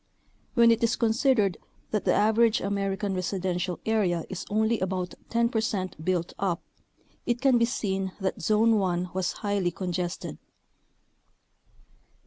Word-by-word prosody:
When 235 -1 +6
it 230 +1 +1
is 230 - +3
considered 225 - +2 0.3
that 210 - -1
the - - +4
average 220 +1 +4
American 195 0 -1
residential 185 -1 -2
area 190 -7 +1
is 190 - -6
only 220 +2 +1
about 185 -1 -2 0.2
10 235 0 +2
percent 200 -8 -2
built 175 -1 -1
up, 185 -3 -1 0.6
it 240 0 +1
can 260 -2 +4
be 235 - +4
seen 195 -6 -2
that 190 -1 -2
Zone 215 +5 +3
1 180 -2 -1
was 185 -1 0
highly 200 -3 +1
congested. 175 0 -4
200 Hz, 130 wpm, -27 LUFS, 185-225 Hz, 0.6 s, When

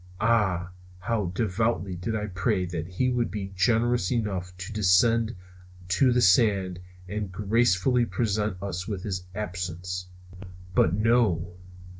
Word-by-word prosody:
Ah, 95 -6 +1 0.3
how 105 +1 -1
devoutly 100 0 -1
I - - -4
did 105 +2 -3
pray 90 0 0
that 85 -2 -4
he 125 +8 0
would 120 -1 0
be 95 -2 -5
generous 115 +1 +2
enough 100 -7 -2
to 95 +4 -7
descend 110 +3 +3 0.5
to 125 +8 +3
the 125 0 +3
sands 95 -2 +3 0.3
and 105 0 -4
gracefully 115 +4 +2
present 105 -4 -1
us 90 -2 -4
with 100 -4 -4
his 90 -3 -4
absence. 90 -2 -4 0.7
But 90 -1 +3
no! 105 -6 +2
100 Hz, 130 wpm, -26 LUFS, 90-115 Hz, 0.7 s, descend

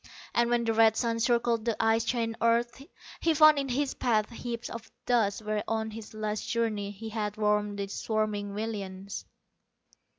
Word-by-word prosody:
And 235 0 +3
when 240 -1 +2
the 225 -1 +1
red 225 0 +5
sun 230 -1 0
circled 235 -1 +2
the 230 -1 -1
ice 225 0 +3
chained 230 -1 -1
earth 235 +2 +2 0.4
he 330 -1 +2
found 310 -1 +7
in 275 -1 -2
his 270 +2 0
path 220 -3 +1
heaps 235 0 -5
of 230 -1 -8 0.2
dust 220 -4 +1
where 215 0 -1
on 220 0 -1
his 220 0 -9
last 215 0 -3
journey 220 -4 0
he 210 +2 -7
had 210 -1 -3
warmed 210 -1 +1
the 200 - -2
swarming 205 -1 -2
millions. 200 -3 -5
225 Hz, 170 wpm, -29 LUFS, 210-235 Hz, 0.4 s, found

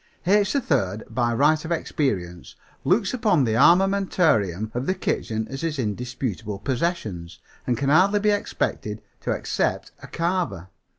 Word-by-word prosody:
"H. 205 +2 +3
3rd 110 - -1
by 120 0 +1
right 150 +6 +3
of 165 - -6
experience 95 - -2 0.3
looks 195 +3 +2
upon 210 - +2
the 115 -3 +1
armamentarium 155 - +3
of 125 +3 -3
the 185 - +1
kitchen 110 -10 -2
as 135 0 -6
his 165 -2 -2
indisputable 110 -2 -3
possessions 115 - -3 0.3
and 120 - +1
can 140 +3 0
hardly 190 +7 +4
be 210 +1 +2
expected 110 - -2 0.2
to - - -6
except - - -1
a - - -10
carver. 165 - -2
135 Hz, 140 wpm, -24 LUFS, 110-180 Hz, 0.3 s, hardly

